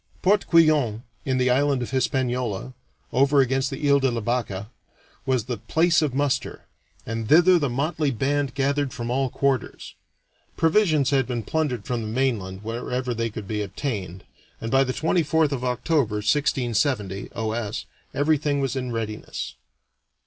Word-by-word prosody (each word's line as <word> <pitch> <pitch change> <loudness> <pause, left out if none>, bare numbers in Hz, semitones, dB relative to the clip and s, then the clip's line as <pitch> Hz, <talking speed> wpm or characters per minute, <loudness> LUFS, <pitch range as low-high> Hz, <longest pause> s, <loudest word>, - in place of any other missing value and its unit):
Port 200 +2 +3
Couillon, 150 - +4 0.2
in 130 -1 0
the 125 0 +2
island 140 0 +2
of - - -6
Hispaniola, 125 -3 -1 0.4
over 140 +2 +4
against 135 0 +2
the 145 +2 -3
Ile 140 0 +5
de 135 -1 +2
la 120 -1 -2
Vache, 110 -4 -2 0.6
was 130 -4 +2
the 125 -2 -3
place 165 - +2
of 145 -5 -1
muster, 140 -1 -1 0.4
and 115 -1 -4
thither 175 +3 +6
the 140 -4 0
motley 145 +4 0
band 135 +3 -1
gathered 140 0 0
from 120 0 -4
all 135 +1 +1
quarters. 135 -3 -2 0.6
Provisions 160 -5 +3
had 135 -2 +2
been 120 -3 -3
plundered 150 0 -1
from 120 -3 -2
the 110 - -4
mainland 110 -6 -1
wherever 125 +2 -3
they 115 0 -1
could 110 -2 -7
be 105 0 -2
obtained, 100 - -4 0.4
and 115 - -5
by 135 0 +5
the 130 - -2
24th 160 0 +1
of 130 -3 -3
October, 125 -1 0
1670 115 -4 0
(O. 110 -1 -2
S.), 110 -2 -3 0.3
everything 145 -1 +1
was 135 -2 -1
in 125 -2 -3
readiness. 110 -2 -4
130 Hz, 155 wpm, -24 LUFS, 115-145 Hz, 0.6 s, thither